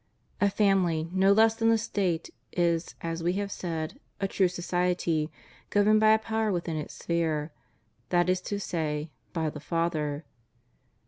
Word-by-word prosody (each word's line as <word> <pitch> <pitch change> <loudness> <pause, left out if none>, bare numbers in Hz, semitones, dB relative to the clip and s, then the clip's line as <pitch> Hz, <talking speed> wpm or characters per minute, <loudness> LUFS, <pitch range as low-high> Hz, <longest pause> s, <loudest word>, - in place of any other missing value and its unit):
A 200 - +5
family, 180 -6 +2
no 190 +1 +4
less 220 +2 +5
than 225 0 +2
a 225 - +5
State, 190 -6 -1 0.2
is, 170 -1 0
as 165 0 -3
we 175 +2 +1
have 200 +1 -2
said, 165 - -4 0.2
a 195 - 0
true 190 -1 +2
society, 175 -3 0 0.4
governed 210 +1 +4
by 215 0 +6
a - - +5
power 220 -1 -1
within 170 -3 -2
its 150 -1 -5
sphere, 160 -2 -1 0.6
that 175 -1 +3
is 185 0 +2
to 205 - -1
say, 155 -4 -2 0.2
by 160 -3 -1
the 150 - -8
father. 155 -2 -1
175 Hz, 155 wpm, -28 LUFS, 165-200 Hz, 0.6 s, by